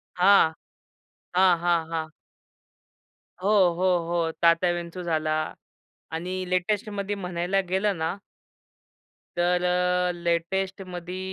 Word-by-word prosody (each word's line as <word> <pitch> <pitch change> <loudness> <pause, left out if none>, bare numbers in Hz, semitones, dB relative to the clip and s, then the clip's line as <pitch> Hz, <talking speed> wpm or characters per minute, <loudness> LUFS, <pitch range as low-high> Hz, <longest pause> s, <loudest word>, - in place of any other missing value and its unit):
हां. 180 -3 +5 0.8
हां, 185 -1 +5
हां, 170 -1 +1
हां. 160 -1 -2 1.4
हो, 200 - +1 0.3
हो, 185 0 +3
हो. 170 -1 0
तात्याविंचू 175 +1 +2
झाला 160 -3 -1 0.8
आणि 180 +3 -3
लेटेस्टमध्ये 200 +2 -1
म्हणायला 180 0 -1
गेलं 190 +1 +1
ना 160 +2 -2 1.2
तर, 180 +1 +2
अ, 180 0 +1
लेटेस्टमध्ये 180 +1 -3
180 Hz, 90 wpm, -26 LUFS, 170-185 Hz, 1.4 s, हां